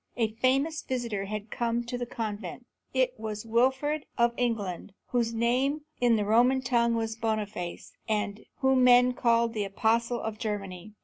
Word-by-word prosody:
A 225 -2 +1
famous 270 +7 +1
visitor 235 -6 -3
had 210 +1 -5
come 235 0 -1
to 240 +1 -5
the 245 0 -3
convent. 215 -3 -5 0.3
It - - +1
was 215 -1 -5
Winfried 265 +6 +1
of 235 0 +3
England, 210 -7 -2 0.2
whose 235 -2 +1
name 250 +6 +1 0.2
in 240 -2 +4
the 210 -2 0
Roman 245 +5 +4
tongue 235 -2 +2
was 225 -1 -2
Boniface, 215 -6 -3 0.2
and 210 -1 -1 0.2
whom 265 -1 +4
men 250 0 +6
called 235 -1 +2
the 215 -2 -1
Apostle 230 +4 +1
of 220 -1 -5
Germany. 205 -2 -5
230 Hz, 160 wpm, -28 LUFS, 215-245 Hz, 0.3 s, men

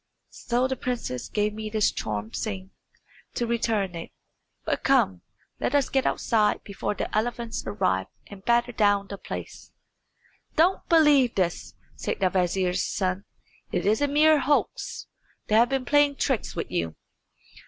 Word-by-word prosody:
So 245 +1 0
the 265 - -2
princess 240 - -4
gave 210 0 0
me 215 0 -5
this 215 -1 +2
charmed 105 +1 -4
swing 190 -3 -4 0.6
to 240 - 0
return 225 -5 0
in. 165 - -6 0.6
But - - -1
come, 90 -2 +3 0.4
let 275 - 0
us 280 -2 +2
get 265 -1 +1
outside 215 -3 +1
before 200 +1 -3
the - - -4
elephants 235 +1 -2
arrive 185 - 0 0.2
and 200 -2 -12
batter 240 +1 +2
down 205 -3 +2
the 200 - -6
place." - - -8 0.8
"Don't 350 +5 +2
believe 295 -7 +5
this," 180 -3 -1 0.2
said - - -3
the 185 -2 +2
vizier's 180 0 +1
son. 185 +1 -2 0.5
"It - - -1
is 215 +6 +2
a 290 - +3
mere 305 +2 +5
hoax. 285 +2 -1 0.4
They - - -3
have 235 +2 +5
been 265 -1 -1
playing 290 +1 +4
tricks 265 -6 -1
with - - -4
you." 80 -1 -2
220 Hz, 155 wpm, -26 LUFS, 190-255 Hz, 0.8 s, believe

